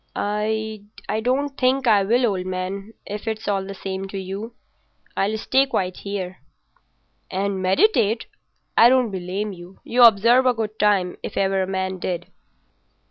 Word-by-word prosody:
"I 215 +1 -2 0.4
don't 260 +5 +1
think 260 +1 +1
I 215 -4 +5
will, 235 +6 +2
old 190 -4 -1
man, 190 +3 -4
if 210 +2 -6
it's 220 -1 -3
all 195 -2 0
the 195 +1 -7
same 190 0 -5
to 195 - -6
you. 195 +5 -6 0.6
I'll 210 +3 0
stay 265 +5 +2
quiet 185 -8 -2
here." 190 -2 -5 0.9
"And 195 0 -2
meditate? 225 - +2 0.5
I 235 - +8
don't 255 -3 +3
blame 190 +3 -3
you. 175 +1 -13
You 245 +1 +1
observe 235 +3 +6
a 250 - +3
good 220 -1 -4
time 195 -4 +2
if - - -7
ever 195 0 +2
a 185 - -1
man 190 -1 -2
did." 175 -1 -4
205 Hz, 155 wpm, -22 LUFS, 190-225 Hz, 0.9 s, I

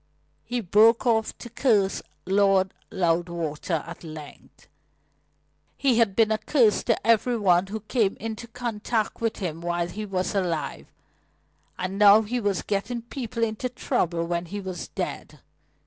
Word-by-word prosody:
He 245 0 -2
broke 220 +5 +4
off 220 -2 +1
to - - -9
curse 215 -5 +1 0.2
Lord 195 0 +3 0.2
Loudwater 170 -2 -1
at 170 +1 -10
length. 155 -3 -11 1.1
He 255 -4 +2
had 210 -5 +3
been 220 -1 +4
a 215 - +1
curse 225 -2 +3
to 230 -3 0
every 230 +2 +3
one 185 -3 +3
who 215 +2 -5
came 215 -2 0
into 225 +1 -5
contact 230 -2 -3
with 225 -1 0
him 170 -4 -4
while 175 0 -1
he 210 +4 -6
was 185 0 -2
alive, 170 -7 -2 0.9
and 190 +2 -3
now 210 +1 +8
he 245 +4 -2
was 205 -4 -1
getting 225 +4 -2
people 235 -1 -4
into 225 +3 -1
trouble 170 -8 -1
when 170 0 -2
he 205 +4 -5
was 185 -3 -6
dead. - - -5
205 Hz, 145 wpm, -25 LUFS, 175-230 Hz, 1.1 s, now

